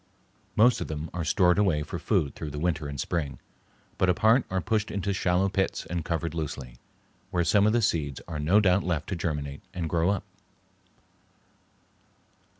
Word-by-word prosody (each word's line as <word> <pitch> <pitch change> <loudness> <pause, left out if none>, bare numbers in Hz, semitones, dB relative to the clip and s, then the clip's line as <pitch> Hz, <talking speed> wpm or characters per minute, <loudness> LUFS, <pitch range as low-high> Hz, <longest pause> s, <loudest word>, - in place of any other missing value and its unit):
Most 120 +2 +5
of - - -3
them 80 +1 -5
are 85 0 -2
stored 90 +3 +3
away 85 -8 +2
for - - -6
food 70 - 0
through 80 - -6
the 75 - -7
winter 80 -1 -1
and 70 -1 -6
spring, 70 -6 -2 0.6
but 95 - +3
a 90 - +4
part 115 +3 +4
are 95 - 0
pushed 105 +4 0
into 100 0 -2
shallow 95 0 +2
pits 95 0 -1
and 85 -1 -3
covered 85 -1 -2
loosely, 65 -6 -5 0.5
where 85 - +1
some 100 +4 +4
of 110 - +3
the 120 -1 +2
seeds 75 -8 0
are 80 -3 -4
no 85 +8 +4
doubt 100 -1 +3
left 85 -4 -2
to 95 - -1
germinate 75 -4 -3
and 85 -2 -2
grow 85 +2 +2
up. 100 -1 0
85 Hz, 180 wpm, -27 LUFS, 75-100 Hz, 0.6 s, Most